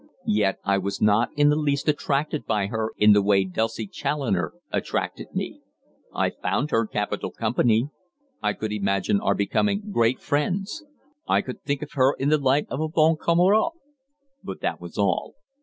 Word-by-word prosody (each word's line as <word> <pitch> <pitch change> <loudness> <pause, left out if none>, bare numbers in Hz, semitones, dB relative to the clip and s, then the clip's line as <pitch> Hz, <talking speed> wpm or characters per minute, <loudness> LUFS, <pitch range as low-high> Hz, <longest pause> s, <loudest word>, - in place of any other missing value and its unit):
Yet 105 -2 +1
I 100 0 +2
was 100 +1 -3
not 105 +3 +3
in 145 0 +5
the 150 - +3
least 145 -2 0
attracted 150 0 0
by 105 -3 +1
her 110 +1 -2
in 105 0 +6
the 105 - +5
way 100 -1 +3
Dulcie 110 +4 -2
Challoner 100 - -2 0.2
attracted - - -2
me. - - -4 0.5
I - - 0
found 150 +3 -2
her 115 -1 +2
capital 105 -1 -2
company; 115 +2 +1 0.5
I - - +1
could 110 -1 -4
imagine 100 -1 0
our 100 - +1
becoming 205 - 0
great 120 - +2
friends; 190 - -2 0.4
I - - +2
could 125 - -7
think 140 +1 -2
of 150 - -9
her 135 0 +3
in 135 - 0
the 155 0 +3
light 140 +1 +2
of 135 - -4
a 160 - 0
bonne 160 0 +3
camarade. 185 - +3 0.7
But - - -7
that - - -2
was - - -10
all. - - 0
130 Hz, 175 wpm, -24 LUFS, 105-150 Hz, 0.7 s, in